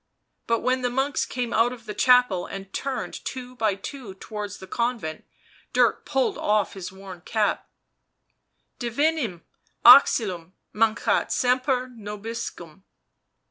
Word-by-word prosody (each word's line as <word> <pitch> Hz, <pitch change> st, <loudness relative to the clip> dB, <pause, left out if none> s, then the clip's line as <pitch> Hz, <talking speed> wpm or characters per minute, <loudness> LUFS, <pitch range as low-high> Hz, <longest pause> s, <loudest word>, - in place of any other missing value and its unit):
But 230 Hz, -1 st, +1 dB
when 255 Hz, 0 st, +1 dB
the 250 Hz, -, 0 dB
monks 270 Hz, +3 st, 0 dB
came 245 Hz, -3 st, -3 dB
out 230 Hz, +2 st, +3 dB
of 240 Hz, -3 st, -10 dB
the 210 Hz, -, -5 dB
chapel 250 Hz, -9 st, +4 dB
and 195 Hz, 0 st, -8 dB
turned 275 Hz, -1 st, -4 dB
two 255 Hz, -1 st, -7 dB
by 220 Hz, -4 st, +1 dB
two 205 Hz, 0 st, -8 dB
towards 205 Hz, 0 st, -6 dB
the 190 Hz, -, -10 dB
convent, 230 Hz, -6 st, -3 dB, 0.5 s
Dirk -, -, +2 dB
pulled 270 Hz, -3 st, 0 dB
off 210 Hz, 0 st, +1 dB
his 185 Hz, -2 st, -7 dB
worn 190 Hz, -2 st, -11 dB
cap: 210 Hz, +3 st, -1 dB, 0.6 s
" -, -, -49 dB
Divinum 240 Hz, -, -1 dB, 0.4 s
auxilium 195 Hz, -9 st, +6 dB, 0.2 s
maneat 225 Hz, +1 st, +1 dB
semper 255 Hz, 0 st, +1 dB
nobiscum." 210 Hz, -6 st, -7 dB
230 Hz, 130 wpm, -25 LUFS, 195-250 Hz, 0.6 s, auxilium